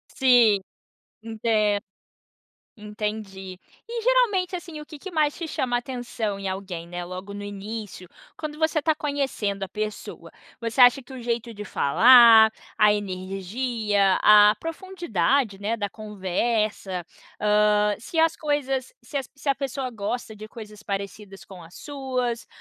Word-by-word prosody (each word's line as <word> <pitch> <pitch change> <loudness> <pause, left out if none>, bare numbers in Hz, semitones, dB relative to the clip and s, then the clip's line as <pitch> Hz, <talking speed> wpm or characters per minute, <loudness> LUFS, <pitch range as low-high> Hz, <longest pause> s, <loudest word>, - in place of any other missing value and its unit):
Sim, 245 -6 +5 0.6
entendo. 215 -2 0 1.0
Entendi. 210 -3 -6 0.3
E 470 0 -3
geralmente, 435 -7 +2
assim, 340 -3 -7
o 300 - -9
que 305 - -11
que 380 +6 -9
mais 305 -3 +1
te 340 - -4
chama 250 -5 -1
atenção 240 -5 -4
em 195 - -4
alguém, 190 -3 -5
né, 175 0 -5
logo 185 +3 -8
no 205 0 -7
início, 205 -1 -7 0.3
quando 305 -1 -6
você 315 0 +1
está 310 +1 +1
conhecendo 270 -10 -2
a - - -3
pessoa? 215 +1 -6 0.3
Você 230 +2 -3
acha 250 +2 +7
que 245 - -16
o 260 -1 -8
jeito 235 0 -3
de 210 -1 -8
falar, 225 - +7 0.3
a 210 -1 +5
energia, 200 +2 -1
a 210 0 +7
profundidade, 285 - -1
né, 210 +3 -1
da 205 -3 -3
conversa, 210 -2 -2 0.4
hã, 210 0 +3
se 280 +9 -7
as 325 0 +3
coisas, 275 - -2
se 290 - -4
as 270 -2 -5
se 285 0 -4
a 275 - +3
pessoa 270 -1 -4
gosta 220 +1 -4
de 215 0 -10
coisas 215 -2 -11
parecidas 200 -1 -6
com 185 -2 -12
as 170 +2 -14
suas, 255 -5 -3
220 Hz, 145 wpm, -24 LUFS, 205-270 Hz, 1.0 s, acha